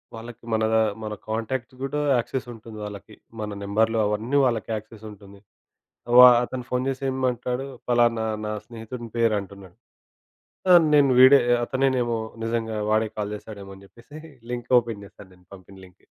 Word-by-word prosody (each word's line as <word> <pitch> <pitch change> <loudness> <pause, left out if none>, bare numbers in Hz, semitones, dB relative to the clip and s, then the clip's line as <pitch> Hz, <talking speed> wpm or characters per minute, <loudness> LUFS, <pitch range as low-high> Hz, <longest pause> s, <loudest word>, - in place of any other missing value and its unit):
వాళ్ళకి 115 +1 -11
మనదా 110 0 +2 0.2
మన 105 0 -4
కాంటాక్ట్స్ 115 +3 -4
గూడా 145 +2 -2 0.2
యాక్సెసుంటుంది 115 -3 -6
వాళ్ళకి. 105 +1 -10 0.3
మన 105 - -4
నెంబరులు 110 +3 +1
అవన్నీ 110 +7 -1
వాళ్ళకి 115 -4 -1
యాక్సెస్ 110 0 -10
ఉంటుంది. 100 -1 -15 0.8
వా 125 0 +11 0.2
అతను 125 0 -6
ఫోన్ 125 +1 -1
చేసి 135 0 -4
ఏమంటాడు 125 0 -2 0.2
పలానా 120 -2 +2 0.2
నా 105 - -3
స్నేహితునిపేరు 115 -1 -3
అంటున్నాడు. 95 -2 -13 1.0
ఆహ్, 175 -1 +8
నేను 140 -2 +5
వీడే 130 +2 +8
ఆహ్, 120 - +3
అతనేనేమో 130 -3 0 0.3
నిజంగా 115 -1 -2
వాడే 110 0 +1
కాల్ 105 0 -3
చేస్తాడేమో 100 -2 -10
అని 100 +1 -16
చెప్పేసి 120 +10 -15 0.3
లింక్ 120 +1 -6
ఓపెన్ 115 -4 -7
చేశాను 100 -1 -15
నేను. 90 0 -26
పంపిన 95 +1 -16
లింక్. 90 - -22
115 Hz, 145 wpm, -24 LUFS, 105-125 Hz, 1.0 s, వా